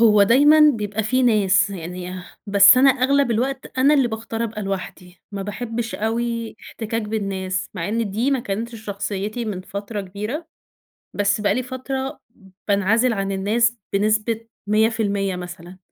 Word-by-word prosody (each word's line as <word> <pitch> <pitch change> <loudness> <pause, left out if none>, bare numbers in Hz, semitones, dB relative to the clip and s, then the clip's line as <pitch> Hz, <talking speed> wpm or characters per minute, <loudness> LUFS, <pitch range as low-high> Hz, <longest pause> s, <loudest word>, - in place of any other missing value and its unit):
هو 210 -3 +6
دايمًا 290 +8 +6
بيبقى 210 0 -3
في 255 +5 +1
ناس، 205 -2 +3
يعني 180 0 -6 0.2
بس 200 +3 +7
أنا 270 +2 +6
أغلب 270 +1 +2
الوقت 260 +3 -2
أنا 280 +3 +5
اللي 270 -4 +3
باختار 225 +1 -4
أبقى 215 -2 -5
لوحدي، 185 -2 -6
ما 200 -1 -4
باحبش 225 +2 -4
أوي 230 +1 -2
احتكاك 225 0 -4
بالناس، 195 -2 -3
مع - - -3
إن 225 -1 -1
دي 230 +7 0
ما 270 -2 +1
كانتش 230 +3 -4
شخصيتي 205 +3 -3
من 205 -4 -4
فترة 200 +2 -5
كبيرة، 210 - -5 0.7
بس 205 +1 +1
بقى 205 -1 +2
لي 255 - -1
فترة 265 +2 -5 0.5
بانعزل 215 +5 +2
عن 195 -2 -2
الناس 225 +5 +1 0.2
بنسبة 215 +2 0 0.2
100% 210 -3 +1
مثلًا 180 0 -9
215 Hz, 145 wpm, -21 LUFS, 200-235 Hz, 0.7 s, بس